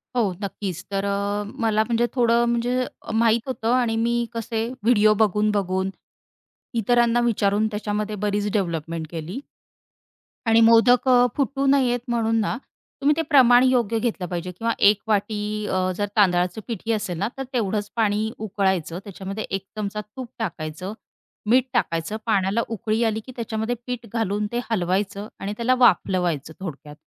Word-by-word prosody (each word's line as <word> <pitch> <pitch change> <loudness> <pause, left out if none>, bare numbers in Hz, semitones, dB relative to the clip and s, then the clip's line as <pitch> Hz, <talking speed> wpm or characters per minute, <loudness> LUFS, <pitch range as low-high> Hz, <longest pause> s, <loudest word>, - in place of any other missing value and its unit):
हो. 220 -6 +2
नक्कीच 190 -3 -4
तर 195 0 -1
अ, 200 +1 -1 0.2
मला 215 -1 +3
म्हणजे 235 +1 +1
थोडं 235 -1 +3
म्हणजे 240 +2 0 0.2
अ, - - -7
माहीत 230 +2 +2
होतं. 235 -3 -1
आणि 240 -3 +2
मी 235 +1 +1
कसे 230 0 -2 0.2
व्हिडिओ 215 -2 +5
बघून-बघून 200 -2 +1 0.9
इतरांना 235 +1 +3
विचारून 215 -2 +2
त्याच्यामध्ये 210 0 -3
बरीच 205 0 -1
डेव्हलपमेंट 165 -4 -2
केली. 170 - -5 1.1
आणि 225 0 +5
मोदक 230 +3 +5 0.3
फुटू 275 0 0
नयेत 260 -3 +3
म्हणून 225 -1 +1
ना, 220 +3 -1 0.4
तुम्ही 290 +2 +4
ते - - +2
प्रमाण 250 -4 +7
योग्य 240 -4 +2
घेतलं 215 -6 -2
पाहिजे 175 +1 -4
किंवा 225 +6 -2 0.2
एक 210 -1 +1
वाटी 210 0 0 0.3
अ, 185 0 0
जर 205 +2 -1
तांदळाचं 180 0 +3
पीठही 230 0 -3
असेल 205 -6 -2
ना 200 +4 0
तर 270 - -3
तेवढंच 210 -3 -1
पाणी 220 -1 +1
उकळायचं 190 -5 -1
त्याच्यामध्ये 195 +1 -6
1 195 0 -3
चमचा 210 0 -3
तूप 220 +4 -9
टाकायचं, 180 -1 -4 0.6
मीठ 250 +2 +5
टाकायचं. 165 -3 -1
पाण्याला 205 0 +1
उकळी 225 0 -1
आली, 220 -1 0
की 255 - -9
त्याच्यामध्ये 225 0 -2
पीठ 245 -2 -4
घालून 210 -2 0
ते 240 - -1
हलवायचं 195 +1 -1
आणि 205 +1 -4
त्याला 245 +2 +2
वाफलवायचं 175 - +2
थोडक्यात, 150 -5 -8
215 Hz, 150 wpm, -23 LUFS, 195-235 Hz, 1.1 s, प्रमाण